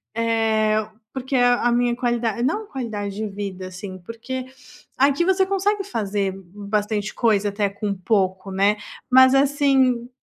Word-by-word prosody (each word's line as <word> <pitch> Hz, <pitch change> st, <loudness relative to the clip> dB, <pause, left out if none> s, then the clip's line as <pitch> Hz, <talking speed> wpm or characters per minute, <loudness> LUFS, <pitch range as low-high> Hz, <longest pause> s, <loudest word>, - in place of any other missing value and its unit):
eh, 220 Hz, -2 st, +1 dB, 0.3 s
porque 265 Hz, 0 st, -3 dB
a 245 Hz, -1 st, +4 dB
a -, -, +2 dB
minha 240 Hz, 0 st, +1 dB
qualida 240 Hz, -2 st, -1 dB
não 420 Hz, +11 st, 0 dB
qualidade 210 Hz, -, -5 dB
de 215 Hz, 0 st, -3 dB
vida, 195 Hz, -2 st, -6 dB
assim, 185 Hz, 0 st, -8 dB
porque, 235 Hz, +6 st, -6 dB, 0.5 s
aqui 280 Hz, +5 st, +3 dB
você 380 Hz, 0 st, +3 dB
consegue 395 Hz, +1 st, 0 dB
fazer 205 Hz, -, -2 dB
b 190 Hz, 0 st, -11 dB, 0.3 s
bastante 210 Hz, 0 st, -1 dB
coisa 210 Hz, -3 st, +2 dB
até 205 Hz, 0 st, -1 dB
com 200 Hz, 0 st, -3 dB
pouco, 190 Hz, 0 st, -1 dB
né, 200 Hz, +2 st, +2 dB, 0.3 s
mas, 260 Hz, +1 st, +7 dB
assim 270 Hz, -3 st, +2 dB
225 Hz, 145 wpm, -22 LUFS, 205-260 Hz, 0.5 s, mas